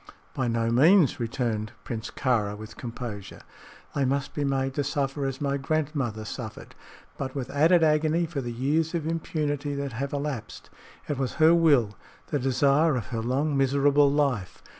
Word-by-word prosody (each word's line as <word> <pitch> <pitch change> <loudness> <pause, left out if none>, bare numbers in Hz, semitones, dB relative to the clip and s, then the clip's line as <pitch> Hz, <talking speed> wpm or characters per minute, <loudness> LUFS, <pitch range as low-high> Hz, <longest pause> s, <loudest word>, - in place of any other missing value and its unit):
"By 130 - -1
no 115 0 0
means," 155 +5 +5
returned 115 -2 -2
Prince 115 -2 -5
Kāra, 105 -6 0
with 110 +1 -10
composure. 115 -5 -7 0.5
"They 140 - 0
must 135 +1 -1
be 145 - -2
made 135 -1 0
to 145 - -1
suffer 140 0 -1
as 135 - -4
my 140 -1 0
grandmother 140 -6 -2
suffered, 110 -1 -7 0.5
but 135 -1 -4
with 130 -3 -4
added 165 +4 +4
agony 155 +2 +2
for 155 -4 -4
the 120 -2 -4
years 150 +7 0
of 160 -3 -2
impunity 150 -3 -2
that 140 -2 -4
have 135 +4 -3
elapsed. 140 -6 -5 0.4
It 145 -3 -2
was 130 -3 -1
her 160 0 +5
will 140 -11 +4 0.4
the 145 - +1
desire 140 +4 +3
of 120 - -2
her 115 -3 -2
long, 140 +6 0
miserable 140 +1 +3
life. 140 -10 -1
140 Hz, 165 wpm, -26 LUFS, 120-150 Hz, 0.5 s, means